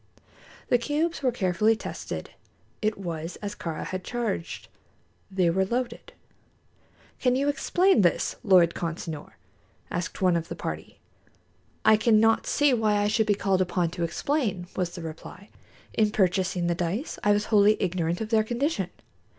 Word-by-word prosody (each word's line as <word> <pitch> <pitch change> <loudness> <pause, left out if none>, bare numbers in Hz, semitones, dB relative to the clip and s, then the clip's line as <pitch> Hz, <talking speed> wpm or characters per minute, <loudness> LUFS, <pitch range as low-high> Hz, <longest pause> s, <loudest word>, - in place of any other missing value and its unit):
The 245 - +4
cubes 300 +7 -1
were 260 -3 +2
carefully 210 0 +2
tested. 220 - -6 0.5
It 215 0 0
was 170 -3 -5
as 205 -1 -6
Kāra 165 -2 -5
had 185 0 -4
charged 225 -8 -3 0.6
they 190 -2 +1
were 190 +3 +2
loaded. 240 +4 -3 1.1
"Can 250 -1 +2
you 275 +2 +1
explain 345 - +3
this, 175 -3 +1
Lord 180 -4 +5
Consinor?" 165 -2 -5 0.6
asked 175 +1 -3
one 185 -2 +3
of 165 -1 -2
the - - -6
party. - - -6 0.9
"I 220 0 +7
cannot 225 0 +3
see 290 -2 +3
why 220 -3 +2
I 205 0 +2
should 215 0 +1
be 205 - +3
called 195 -2 +1
upon 175 -2 0
to 175 0 -3
explain," 200 - -1
was 175 -2 -2
the 175 - -7
reply. 165 +5 -9 0.4
"In 215 -1 +3
purchasing 185 -3 +1
the 170 - +2
dice, 180 - -3
I 205 - +4
was 205 0 +2
wholly 210 +1 +6
ignorant 175 -1 -1
of 220 - -3
their 220 -1 +3
condition. 260 +8 -1
200 Hz, 155 wpm, -26 LUFS, 175-225 Hz, 1.1 s, I